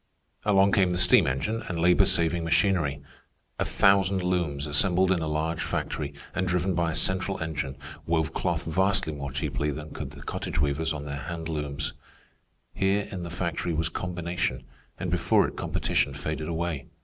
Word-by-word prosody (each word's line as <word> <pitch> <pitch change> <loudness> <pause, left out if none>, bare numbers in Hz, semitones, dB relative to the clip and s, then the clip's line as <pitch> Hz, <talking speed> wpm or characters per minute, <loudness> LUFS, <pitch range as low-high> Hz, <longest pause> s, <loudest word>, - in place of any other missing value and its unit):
Along 100 -1 +5
came 95 -2 +3
the 90 - 0
steam 90 0 +6
engine 105 - -1
and 90 - -2
labor 90 +3 +5
saving 85 -3 +1
machinery. 80 -4 +2 0.6
A - - +1
thousand 95 -1 +3
looms 85 -6 0
assembled 90 +5 +3
in 95 - +3
a 80 - -2
large 80 +2 -1
factory, 75 -2 -3 0.2
and 95 0 -1
driven 90 +1 +1
by 85 -1 +1
a - - -4
central 95 +3 +1
engine 75 -4 -3 0.3
wove 80 -1 +1
cloth 85 -2 -1
vastly 95 0 +1
more 70 -2 -5
cheaply 70 +1 -1
than 75 +1 -6
could - - -5
the - - -11
cottage - - -4
weavers 75 +3 +1
on 75 -2 -4
their 70 0 -4
hand 80 +1 -5
looms. 75 -2 -2 0.8
Here 100 +1 +1
in 95 - -5
the 85 - -5
factory 85 -1 -2
was 80 +1 0
combination, 85 -7 -2 0.4
and - - -2
before - - +3
it - - -8
competition 70 - 0
faded 75 +2 -3
away. 85 -4 -2
85 Hz, 175 wpm, -27 LUFS, 75-90 Hz, 0.8 s, steam